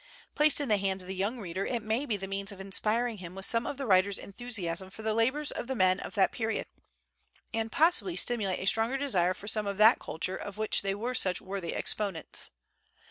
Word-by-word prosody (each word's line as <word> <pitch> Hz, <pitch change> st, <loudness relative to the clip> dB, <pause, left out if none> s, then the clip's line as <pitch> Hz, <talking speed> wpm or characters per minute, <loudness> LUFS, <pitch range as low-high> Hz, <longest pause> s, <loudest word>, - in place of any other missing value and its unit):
Placed 300 Hz, 0 st, +4 dB
in 285 Hz, -, -1 dB
the 210 Hz, -3 st, +3 dB
hands 190 Hz, -1 st, 0 dB
of -, -, -13 dB
the 190 Hz, -, -4 dB
young 200 Hz, +6 st, -1 dB
reader, 190 Hz, -1 st, -4 dB
it 235 Hz, -1 st, -2 dB
may 225 Hz, +7 st, -1 dB
be 215 Hz, -, -1 dB
the 195 Hz, 0 st, -6 dB
means 195 Hz, +1 st, -3 dB
of 200 Hz, -, -11 dB
inspiring 215 Hz, +4 st, -1 dB
him 180 Hz, 0 st, -8 dB
with 195 Hz, 0 st, -1 dB
some 230 Hz, 0 st, +1 dB
of 280 Hz, -, -4 dB
the 275 Hz, -, -4 dB
writer's 195 Hz, -1 st, +3 dB
enthusiasm 190 Hz, -5 st, -3 dB
for 215 Hz, +3 st, -11 dB
the 220 Hz, 0 st, 0 dB
labors 260 Hz, +7 st, +1 dB
of -, -, -5 dB
the 265 Hz, -, -2 dB
men 185 Hz, -3 st, +3 dB
of -, -, -7 dB
that 195 Hz, -2 st, +3 dB
period, 225 Hz, -1 st, -2 dB, 0.9 s
and 225 Hz, 0 st, -2 dB
possibly 345 Hz, +4 st, +3 dB
stimulate 210 Hz, -6 st, +3 dB
a -, -, -5 dB
stronger 225 Hz, +6 st, +3 dB
desire 185 Hz, -10 st, +1 dB
for 205 Hz, -, -11 dB
some 215 Hz, -1 st, +1 dB
of 200 Hz, -1 st, -3 dB
that 220 Hz, +3 st, +6 dB
culture 185 Hz, +4 st, -3 dB
of 205 Hz, +1 st, -7 dB
which 215 Hz, 0 st, +2 dB
they 195 Hz, 0 st, -1 dB
were 235 Hz, +5 st, -3 dB
such 185 Hz, -6 st, +2 dB
worthy 190 Hz, -3 st, -5 dB
exponents. 200 Hz, -6 st, -1 dB
210 Hz, 225 wpm, -29 LUFS, 190-235 Hz, 0.9 s, that